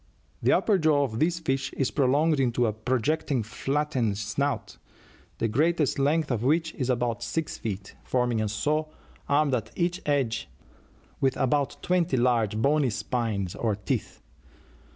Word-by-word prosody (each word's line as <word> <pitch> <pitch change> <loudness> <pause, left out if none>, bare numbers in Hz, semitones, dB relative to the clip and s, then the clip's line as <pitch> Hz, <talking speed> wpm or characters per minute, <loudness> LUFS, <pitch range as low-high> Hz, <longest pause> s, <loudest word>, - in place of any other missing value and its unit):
The - - +3
upper 205 -4 +3
jaw 155 -3 +3
of 115 -4 -3
this 170 +2 +2
fish 135 -5 -1
is 135 - -1
prolonged 145 +3 +2
into 120 -2 +2
a 110 - 0
projecting 130 +4 0
flattened 130 -2 -1
snout, 130 +7 -2 0.6
the 115 - 0
greatest 150 +5 +1
length 150 +2 +2
of 115 -3 0
which 160 +5 +1
is 130 -3 -3
about 120 -2 0
six 160 +5 -2
feet, 100 -3 -5
forming 125 -3 0
a 110 - -1
saw, 150 +9 0 0.4
armed 145 -1 +3
at 110 -3 -1
each 175 +1 -1
edge 130 -6 0 0.7
with 135 -1 +1
about 140 0 +1
twenty 175 -6 +1
large 115 -4 +2
bony 140 +3 +2
spines 110 -5 -2
or 110 -3 -1
teeth. 105 - -4
130 Hz, 150 wpm, -27 LUFS, 115-150 Hz, 0.7 s, The